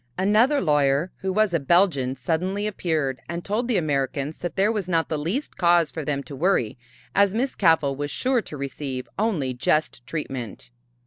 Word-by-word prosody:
Another 215 +10 +3
lawyer, 145 +1 +2
who 190 -1 -2
was 210 -1 +2
a 170 - +2
Belgian, 140 -4 +2
suddenly 180 +9 -1
appeared 160 -10 -1
and 170 +1 -5
told 220 +4 -1
the 240 -5 +1
Americans 145 -1 -1
that 175 - -4
there 200 +3 +3
was 210 -5 -3
not 165 -2 +1
the 160 - -1
least 190 - -3
cause 175 -2 +3
for 160 - -5
them 140 -1 -2
to 140 +2 -9
worry 145 - +1 0.4
as 200 0 +3
Miss 260 +4 0
Cavell 160 -7 +3
was 145 +1 -3
sure 255 - +1
to 150 - -8
receive 135 -1 -5
only 175 - 0
just 125 0 0
treatment. 125 -7 -6
165 Hz, 180 wpm, -24 LUFS, 140-195 Hz, 0.4 s, Another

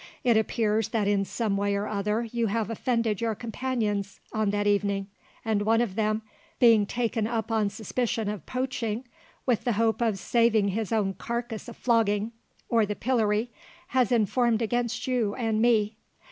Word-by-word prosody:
It 240 -3 +4
appears 220 -1 +1
that 215 -4 0
in 200 -1 +2
some 215 -1 -1
way 200 0 +1
or 200 +1 -1
other 210 +2 -1
you 235 0 -1
have 225 +1 -1
offended 230 -2 0
your 225 -2 0
companions 220 -4 -2
on 215 -2 +1
that 205 0 0
evening, 200 -1 +1 0.4
and 220 -2 +1
one 225 +2 +3
of 235 -5 0
them 215 +1 0 0.3
being 225 -5 +5
taken 230 -2 -1
up 230 -1 -2
on 215 -2 +2
suspicion 220 +1 -2
of 205 -6 -5
poaching 250 -2 -2 0.4
with 245 -4 +1
the 240 - +1
hope 225 +2 +1
of 225 -4 +1
saving 225 -1 +2
his 215 +2 -2
own 205 -4 +1
carcass 235 +3 -4
a 235 - -8
flogging, 220 -2 +1 0.4
or 230 -2 +3
the 210 0 -2
pillory, 225 -2 +1 0.4
has 255 -3 +2
informed 235 0 +2
against 240 +1 -1
you 240 -5 0
and 225 -3 0
me. 220 -2 +3
220 Hz, 170 wpm, -27 LUFS, 210-235 Hz, 0.4 s, being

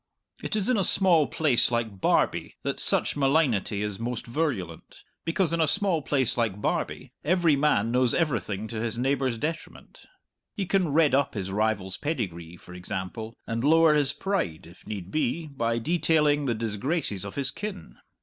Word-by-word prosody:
It - - -3
is 205 -2 0
in 250 -2 +2
a - - +2
small 175 -5 +4
place 145 -7 +2
like 115 -5 -2
Barbie - - +1
that - - -2
such - - +3
malignity 135 -8 +1
is 105 -1 -4
most 120 0 -4
virulent, 115 - -4 0.2
because 170 +1 0
in 170 - +1
a 160 - +3
small 180 +1 +1
place 130 -4 +1
like 110 -4 0
Barbie - - -2
every 170 -2 +3
man 135 -6 +2
knows 125 -1 +2
everything 110 - -1
to 110 -2 -4
his 115 0 -2
neighbour's 130 -1 0
detriment. 160 +6 -6 0.5
He 200 - -2
can 185 -2 +1
redd 155 0 +3
up 140 -1 +1
his 95 -2 -4
rival's 100 -2 -1
pedigree, 90 - -4
for 90 - -14
example, 95 +5 -6
and 115 +1 -3
lower 160 +1 +5
his 145 -2 +4
pride 190 - -2
(if 85 +2 -17
need 95 -4 -6
be) 155 +2 -1
by 115 -6 -2
detailing 150 0 +2
the 120 - 0
disgraces 110 - -2
of 100 - -7
his 135 -2 0
kin. 205 +6 -7
130 Hz, 170 wpm, -26 LUFS, 110-160 Hz, 0.5 s, lower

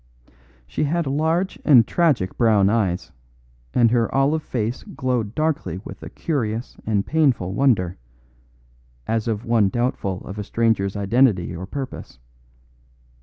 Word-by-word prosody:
She 60 - -2
had 170 +3 0
large 160 +7 0
and 125 -7 +6
tragic 145 - +1
brown 105 -4 +3
eyes, 100 -6 0 0.6
and 115 -2 +4
her 120 -2 +1
olive 140 +4 +2
face 120 -4 -3
glowed 125 - -3
darkly 155 - -1
with - - -9
a - - -8
curious 120 -7 -3
and 105 -2 +1
painful 130 - +1
wonder 100 - +1 1.1
as 115 0 -1
of 110 +1 -2
one 115 -4 +3
doubtful 110 -5 -2
of 100 +3 -8
a - - -2
stranger's 110 -3 0
identity 100 -4 +2
or 90 +2 -6
purpose. 135 - -7
115 Hz, 130 wpm, -22 LUFS, 100-135 Hz, 1.1 s, and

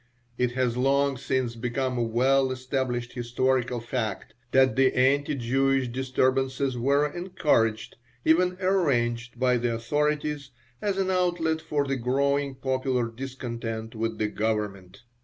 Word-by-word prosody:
It 125 0 0
has 125 -2 0
long 140 +2 +2
since 130 -2 -1
become 125 +2 -2
a 120 - 0
well 130 +4 +2
established 130 -2 -2
historical 125 0 0
fact 110 -2 -4 0.2
that 130 0 +4
the 130 0 +4
anti 140 +3 +2
Jewish 135 +1 +1
disturbances 130 +1 0
were 140 +4 +2
encouraged, 150 - 0 0.3
even 180 +3 +3
arranged, 125 -11 0
by 125 -1 +3
the 120 -1 -1
authorities 145 +4 -1 0.3
as 200 -2 -1
an 190 -1 +1
outlet 175 -3 +1
for 150 -3 -1
the 135 -1 -1
growing 140 +3 0
popular 130 -2 -1
discontent 115 -3 -5
with 110 0 -3
the 105 - 0
Government. 105 -2 -3
130 Hz, 130 wpm, -26 LUFS, 120-140 Hz, 0.3 s, that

